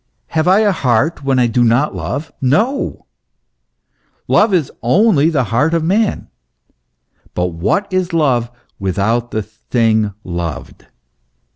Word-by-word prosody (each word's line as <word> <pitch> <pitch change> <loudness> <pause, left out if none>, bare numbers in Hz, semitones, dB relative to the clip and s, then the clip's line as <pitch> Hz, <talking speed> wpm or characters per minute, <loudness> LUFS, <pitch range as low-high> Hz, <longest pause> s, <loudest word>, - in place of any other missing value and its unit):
Have 160 +1 0
I 190 +4 +5
a 210 -2 +3
heart 140 0 0
when 135 -1 +1
I 125 - +4
do 120 +1 +1
not 120 +5 +2
love? 120 - -4
No! 215 - 0 1.2
love 215 - +3 0.3
only 160 - +3
is 165 - 0
the 135 -4 +2
heart 125 +10 +1
of 165 - 0
man. 200 +6 0 1.1
But 90 0 0
w 85 -1 -11
T 95 - 0
hat 200 -1 -1
is 185 -1 0
love 130 -8 +1 0.3
without 105 +5 -1
the 110 -2 -3
thing 110 -1 -1
loved 85 -2 -6
130 Hz, 140 wpm, -16 LUFS, 110-165 Hz, 1.2 s, I